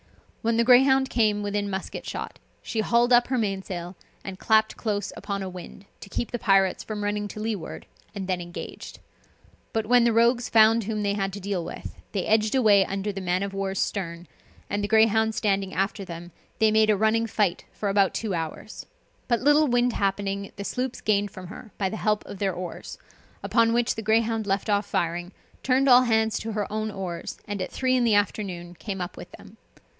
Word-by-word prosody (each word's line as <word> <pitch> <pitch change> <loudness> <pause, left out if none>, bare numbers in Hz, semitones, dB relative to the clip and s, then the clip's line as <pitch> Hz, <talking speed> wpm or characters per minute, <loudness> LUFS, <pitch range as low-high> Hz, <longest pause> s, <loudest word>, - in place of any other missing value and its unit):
When 230 0 +1
the 235 - +4
Greyhound 265 +2 +5
came 210 -3 +2
within 205 0 -2
musket 190 -1 -5
shot, - - -6 0.2
she 225 - -3
hauled 235 +2 +3
up 240 0 +5
her 260 - 0
mainsail, 190 -4 -3 0.3
and 190 -1 -7
clapped 220 0 +3
close 205 -3 -3
upon 200 0 -4
a - - -4
wind, 185 +2 -10
to - - -11
keep 235 - -3
the 240 - -3
pirates 195 -3 +3
from 210 -1 -5
running 205 0 -1
to 215 - -9
leeward, 215 -6 -4 0.3
and 195 -2 -4
then 185 -2 -1
engaged. 175 0 -8 0.7
But 220 -1 -1
when 245 +2 +5
the 235 - +3
rogues 235 +2 +3
found 225 0 +5
whom 215 -1 -2
they 200 0 +1
had 195 -1 -1
to 200 - -6
deal 195 -3 -2
with, 170 - -8 0.2
they 195 -3 -1
edged 215 +2 +2
away 210 -6 +5
under 195 +2 -3
the 195 -1 -6
man 180 +1 0
of 200 0 -4
war's 195 0 -3
stern, 170 -4 -3 0.4
and 205 0 -2
the - - 0
Greyhound 220 0 +3
standing 195 -2 0
after 195 +2 -1
them, 175 -1 -8 0.3
they 220 -1 +4
made 215 0 +4
a 210 - +4
running 220 +2 +2
fight 205 -4 0
for 210 - -4
about 195 -1 +2
two 215 -4 -2
hours; 165 +5 -5 0.4
but 235 -2 +1
little 295 +3 +5
wind 245 -1 +2
happening, 200 0 -2
the 200 - -6
sloops 250 +4 -3
gained 205 -1 +1
from 185 -1 -10
her, 210 +3 -11
by 195 -2 0
the 220 - -5
help 210 -1 0
of 195 - -9
their 195 -2 0
oars; 175 0 -7 0.5
upon 230 -1 +3
which 240 0 +2
the 225 - -5
Greyhound 225 0 +1
left 195 +2 0
off 205 -1 +1
firing, 175 +2 -2 0.3
turned 265 +1 +2
all 250 -1 +8
hands 220 -2 +2
to 225 0 -5
her 205 -1 -1
own 215 0 -1
oars, 185 -4 -5
and 205 -2 -4
at - - -4
three 255 -1 +1
in 250 - +2
the 225 -3 +3
afternoon 185 -4 -1
came 195 +2 -6
up 175 -1 -5
with - - -10
them. - - -14
205 Hz, 205 wpm, -25 LUFS, 195-225 Hz, 0.7 s, all